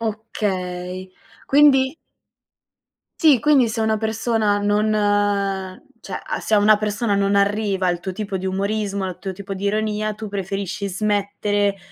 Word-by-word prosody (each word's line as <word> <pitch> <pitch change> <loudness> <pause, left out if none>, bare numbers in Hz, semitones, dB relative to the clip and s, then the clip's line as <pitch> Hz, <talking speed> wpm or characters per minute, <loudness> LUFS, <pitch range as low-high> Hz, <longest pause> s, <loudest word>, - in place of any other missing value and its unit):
Okay, 185 -4 -4 0.4
quindi 270 -1 +5 1.3
Sì, 295 -6 +6
quindi 280 -5 +4
se 220 0 -2
una 220 -1 +1
persona 220 -1 0
non 205 +1 +1 1.1
cioè, - - -6
a - - -3
se 220 - 0
a - - +5
una 210 0 +5
persona 210 0 -1
non 200 0 +1
arriva 200 -2 +1
il 175 - -3
tuo 185 +2 -4
tipo 200 -1 -4
di 190 - -4
umorismo, 200 0 -1
il 185 - -6
tuo 190 -1 -5
tipo 195 +1 -7
di 195 +1 -5
ironia, 215 +1 -1
tu 215 +1 -7
preferisci 200 +1 -4
smettere 205 0 0
205 Hz, 145 wpm, -21 LUFS, 195-220 Hz, 1.3 s, Sì